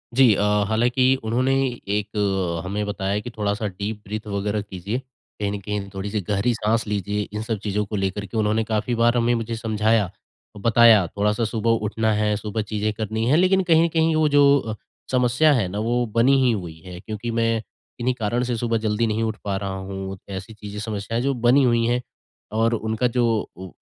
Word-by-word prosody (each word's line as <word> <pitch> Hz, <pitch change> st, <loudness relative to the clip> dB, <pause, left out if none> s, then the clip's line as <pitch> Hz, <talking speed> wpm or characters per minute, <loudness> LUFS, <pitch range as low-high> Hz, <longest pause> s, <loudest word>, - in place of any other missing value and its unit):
जी। 130 Hz, -4 st, +6 dB
अ, -, -, -1 dB, 0.3 s
हालाँकि 120 Hz, +4 st, +2 dB, 0.2 s
उन्होंने 125 Hz, +4 st, +1 dB, 0.3 s
एक 100 Hz, -4 st, -1 dB
हमें 105 Hz, +2 st, -2 dB
बताया 100 Hz, 0 st, -2 dB
कि 105 Hz, -, -7 dB
थोड़ा-सा 105 Hz, +1 st, -1 dB
डीप 105 Hz, +2 st, -5 dB
ब्रीथ 110 Hz, +2 st, -6 dB
वगैरह 105 Hz, +1 st, -1 dB
कीजिए। 100 Hz, +3 st, -4 dB
कहीं 125 Hz, -5 st, -7 dB
न 100 Hz, -, -4 dB
कहीं 100 Hz, 0 st, -4 dB
थोड़ी-सी 100 Hz, +2 st, -3 dB
गहरी 105 Hz, +4 st, +1 dB
साँस 115 Hz, +1 st, 0 dB
लीजिए, 105 Hz, 0 st, -1 dB
इन 105 Hz, -, -3 dB
सब 110 Hz, 0 st, -2 dB
चीज़ों 105 Hz, 0 st, -1 dB
को 105 Hz, -, -5 dB
लेकर 95 Hz, +1 st, -2 dB
के 100 Hz, +3 st, -6 dB
उन्होंने 110 Hz, +1 st, +1 dB
काफ़ी 110 Hz, +2 st, -1 dB
बार 120 Hz, +1 st, +3 dB
हमें 120 Hz, 0 st, +2 dB
मुझे 115 Hz, 0 st, -3 dB
समझाया, 110 Hz, -2 st, +1 dB, 0.5 s
बताया, 115 Hz, -1 st, +6 dB
थोड़ा-सा 105 Hz, +5 st, 0 dB
सुबह 115 Hz, 0 st, -1 dB, 0.2 s
उठना 110 Hz, +1 st, 0 dB
है, 105 Hz, 0 st, +1 dB
सुबह 105 Hz, +1 st, -3 dB
चीज़ें 105 Hz, 0 st, 0 dB
करनी 110 Hz, +1 st, -2 dB
हैं, 150 Hz, -, +5 dB
लेकिन 190 Hz, +2 st, +3 dB
कहीं 165 Hz, 0 st, +6 dB
न -, -, +3 dB
कहीं 160 Hz, 0 st, +3 dB
वो 155 Hz, -1 st, +3 dB
जो 145 Hz, -, +7 dB, 0.2 s
अ, 110 Hz, -4 st, -5 dB, 0.4 s
समस्या 125 Hz, +4 st, +3 dB
है 115 Hz, -9 st, +1 dB
ना 100 Hz, +3 st, -4 dB
वो 120 Hz, +1 st, +1 dB
बनी 125 Hz, +4 st, +5 dB
ही 125 Hz, -, +4 dB
हुई 85 Hz, -7 st, -5 dB
है 90 Hz, -1 st, -8 dB
क्योंकि 110 Hz, +4 st, -5 dB
मैं 115 Hz, -1 st, +1 dB, 0.4 s
इन्हीं 125 Hz, +2 st, +1 dB
कारण 115 Hz, +3 st, 0 dB
से 120 Hz, -1 st, -1 dB
सुबह 115 Hz, 0 st, 0 dB
जल्दी 110 Hz, +1 st, +1 dB
नहीं 110 Hz, +1 st, 0 dB
उठ 110 Hz, -1 st, -1 dB
पा 100 Hz, -1 st, -2 dB
रहा 95 Hz, -1 st, -4 dB
हूँ। 95 Hz, 0 st, -5 dB
ऐसी 95 Hz, +2 st, -6 dB
चीज़ें 105 Hz, -1 st, -8 dB
समस्याएँ 110 Hz, +1 st, -3 dB
जो 140 Hz, +1 st, +1 dB
बनी 135 Hz, +3 st, +6 dB
हुई 120 Hz, -2 st, +3 dB
हैं 120 Hz, +1 st, +1 dB, 0.6 s
और 115 Hz, +1 st, +3 dB
उनका 110 Hz, +2 st, 0 dB
जो 120 Hz, -, +4 dB, 0.3 s
वो 95 Hz, +1 st, -8 dB
110 Hz, 200 wpm, -23 LUFS, 100-120 Hz, 0.6 s, जो